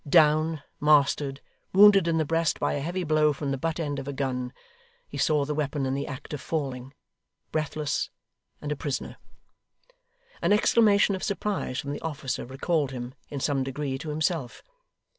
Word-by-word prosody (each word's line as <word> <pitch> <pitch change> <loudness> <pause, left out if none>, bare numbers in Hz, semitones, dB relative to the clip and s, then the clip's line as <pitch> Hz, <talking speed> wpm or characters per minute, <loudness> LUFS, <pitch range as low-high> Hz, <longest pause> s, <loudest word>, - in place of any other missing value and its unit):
Down, 155 0 +4 0.2
mastered, 145 -2 +3 0.3
wounded 195 -2 +7
in 165 -1 +2
the 160 - +1
breast 165 +1 +1
by - - +1
a - - -1
heavy 175 +5 -2
blow 155 -2 +3
from 140 0 -3
the 135 - -1
butt 165 +3 -2
end 145 -3 -2
of 135 - -7
a 140 - -3
gun 125 -2 -2 0.6
(he - - -7
saw 150 -2 +2
the 150 - -2
weapon 145 -2 -1
in 130 - 0
the 140 +1 -2
act 140 +2 -7
of 145 - -4
falling) 135 -4 -4 0.6
breathless 150 -2 -1 0.5
and 150 - -5
a - - 0
prisoner. 140 -1 -4 1.2
An - - +3
exclamation 210 -1 +4
of 190 - -3
surprise 200 -9 -2
from 140 - -4
the 145 - -5
officer 145 -6 -3
recalled 140 +2 0
him, 125 -1 -6 0.2
in 140 - -4
some 135 -1 +1
degree, 135 0 -3
to 155 - -6
himself. 155 -4 -2
150 Hz, 175 wpm, -27 LUFS, 135-160 Hz, 1.2 s, wounded